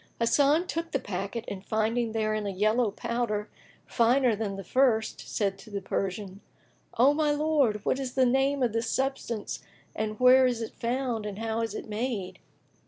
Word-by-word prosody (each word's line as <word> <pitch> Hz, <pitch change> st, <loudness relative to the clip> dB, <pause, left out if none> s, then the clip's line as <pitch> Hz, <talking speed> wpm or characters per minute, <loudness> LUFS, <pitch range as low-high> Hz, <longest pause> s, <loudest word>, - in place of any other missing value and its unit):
Hasan 285 Hz, +8 st, +3 dB
took 335 Hz, -2 st, -4 dB
the 275 Hz, -, +2 dB
packet 200 Hz, +3 st, -4 dB
and 190 Hz, -1 st, -6 dB
finding 220 Hz, +2 st, 0 dB
therein 215 Hz, -1 st, -1 dB
a -, -, -1 dB
yellow 215 Hz, +4 st, +2 dB
powder, 230 Hz, -1 st, -2 dB, 0.4 s
finer 240 Hz, 0 st, +3 dB
than 205 Hz, -2 st, -3 dB
the 195 Hz, -, -6 dB
first, 225 Hz, 0 st, +2 dB
said 195 Hz, -2 st, -2 dB
to 195 Hz, -, -13 dB
the 200 Hz, -1 st, -3 dB
Persian, 195 Hz, +1 st, -4 dB, 0.6 s
"O 265 Hz, +5 st, +6 dB
my 305 Hz, 0 st, +1 dB
lord, 290 Hz, -8 st, +1 dB
what 260 Hz, -, +1 dB
is 260 Hz, -2 st, -4 dB
the 260 Hz, -1 st, +4 dB
name 270 Hz, +2 st, +2 dB
of 235 Hz, -3 st, +1 dB
this 230 Hz, 0 st, -1 dB
substance 260 Hz, -5 st, -2 dB, 0.4 s
and 215 Hz, 0 st, -3 dB
where 255 Hz, +1 st, +7 dB
is 245 Hz, -2 st, -1 dB
it 225 Hz, -, -5 dB
found 235 Hz, -2 st, -2 dB
and 200 Hz, -1 st, -6 dB
how 225 Hz, +1 st, -2 dB
is 225 Hz, -, -3 dB
it -, -, -6 dB
made?" 210 Hz, -4 st, -3 dB
230 Hz, 175 wpm, -28 LUFS, 210-260 Hz, 0.6 s, where